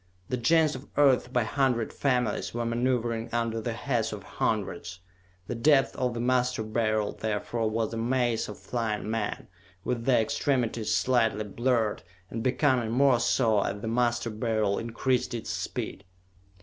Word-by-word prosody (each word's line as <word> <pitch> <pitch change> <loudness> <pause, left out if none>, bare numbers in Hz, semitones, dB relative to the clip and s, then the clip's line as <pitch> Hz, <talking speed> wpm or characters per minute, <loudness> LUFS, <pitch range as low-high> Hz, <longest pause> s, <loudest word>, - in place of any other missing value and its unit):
The 125 - 0
Gens 155 +5 +3
of 130 +2 -8
Earth, 135 -4 +4
by 125 -2 +2
hundred 125 -2 0
families, 125 -6 0
were 120 0 -1
maneuvering 115 -1 0
under 115 -1 -1
the 115 +1 -3
Heads 115 -2 -1
of 105 -2 -7
Hundreds. 90 -4 -2 0.5
The - - -4
depths 135 +4 +3
of 125 -1 -1
the - - -3
Master 125 -1 +1
Beryl, 110 -1 0
therefore, 110 +1 -2
was 110 +1 -1
a - - -3
maze 120 -1 0
of 105 - -7
flying 110 -3 -3
men, 110 -2 -3 0.4
with 120 -2 -2
their 130 -3 +4
extremities 115 -1 0
slightly 115 -4 +2
blurred, 115 +1 0 0.3
and 115 - -3
becoming 130 -2 +2
more 130 +1 +4
so 120 -2 +2
as 100 +1 -2
the 110 - -4
Master 120 0 +1
Beryl 110 -2 0
increased 120 +2 -1
its 115 - -4
speed. - - -4
115 Hz, 155 wpm, -28 LUFS, 110-125 Hz, 0.5 s, Earth